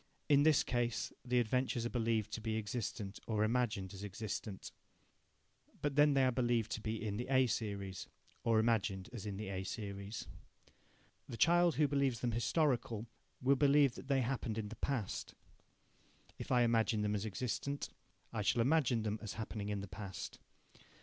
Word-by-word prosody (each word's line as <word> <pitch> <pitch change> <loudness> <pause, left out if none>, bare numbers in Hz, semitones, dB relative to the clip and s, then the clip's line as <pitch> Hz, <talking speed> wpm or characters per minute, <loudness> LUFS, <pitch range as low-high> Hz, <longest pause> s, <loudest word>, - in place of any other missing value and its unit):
In 145 -2 +6
this 155 -1 +5
case, 120 -2 -1
the 125 0 +2
adventures 120 0 0
are 120 - -2
believed 115 -3 0
to 110 - -4
be 110 0 -1
existent 105 -2 -4
or 110 -2 +1
imagined 110 -4 0
as 95 +1 -8
existent. 105 0 -5 1.1
But 145 -2 -1
then 145 0 +5
they 135 -1 +5
are 130 - +3
believed 120 -3 +1
to 110 - -2
be 110 0 -2
in 105 -1 -2
the 120 - -3
A 130 -1 +4
series, 100 -5 -3 0.4
or 115 -1 +3
imagined 110 -3 +1
as 110 -3 -5
in 100 -2 -4
the 105 -1 -4
A 95 -1 -3
series. 100 +1 -5 1.0
The 115 - -5
child 175 +2 +5
who 150 -1 +4
believes 140 -4 +1
them 120 - 0
historical 120 -2 +1 0.4
will 135 +2 +5
believe 140 -1 +5
that 135 - -10
they 135 -2 +3
happened 120 -3 -2
in 105 -2 -3
the 115 - -7
past. 125 -8 -2 1.0
If - - -6
I 125 -1 +5
imagine 115 -2 +2
them 105 0 +1
as 105 -1 -1
existent, 130 +7 -3 0.4
I 110 - -1
shall 110 +3 +2
imagine 130 -5 +3
them 105 0 -2
as 105 -4 -5
happening 105 0 -4
in 100 -1 -2
the 100 - -6
past. 95 -1 -7
115 Hz, 175 wpm, -36 LUFS, 105-130 Hz, 1.1 s, In